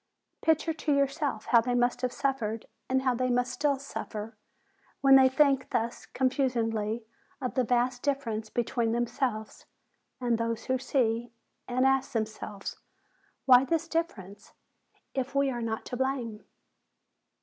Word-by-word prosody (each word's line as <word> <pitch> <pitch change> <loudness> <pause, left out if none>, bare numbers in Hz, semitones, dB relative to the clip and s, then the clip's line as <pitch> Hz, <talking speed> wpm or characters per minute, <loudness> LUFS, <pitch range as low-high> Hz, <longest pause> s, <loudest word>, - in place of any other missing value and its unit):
Picture 320 0 +2
to 310 -1 -2
yourself 275 -4 0
how 235 -2 +5
they 245 +1 -1
must 245 0 +1
have 250 -1 0
suffered, 230 -6 -2 0.2
and 260 0 +2
how 255 -1 +3
they 255 +1 0
must 245 0 +1
still 290 0 +1
suffer, 225 -5 -6 0.7
when 270 -1 +7
they 265 -1 +7
think 270 -1 +3
thus 230 +1 -2
confusedly 235 -4 0 0.4
of 255 -3 -3
the 255 - +2
vast 245 +1 +1
difference 230 -7 -2
between 235 0 0
themselves 235 -2 -2 0.5
'and 240 -2 +1
those 230 0 -2
who 260 0 0
see, 240 -3 0 0.4
and 255 +1 +1
ask 270 0 +2
themselves, 215 -3 -4 0.7
"Why 255 -1 +8
this 330 +4 0
difference, 210 - -4 0.6
if 265 +1 -3
we 275 -1 +3
are 240 -1 -4
not 225 -1 -3
to 250 - -5
blame?' 250 -5 -2
250 Hz, 140 wpm, -29 LUFS, 230-270 Hz, 0.7 s, Why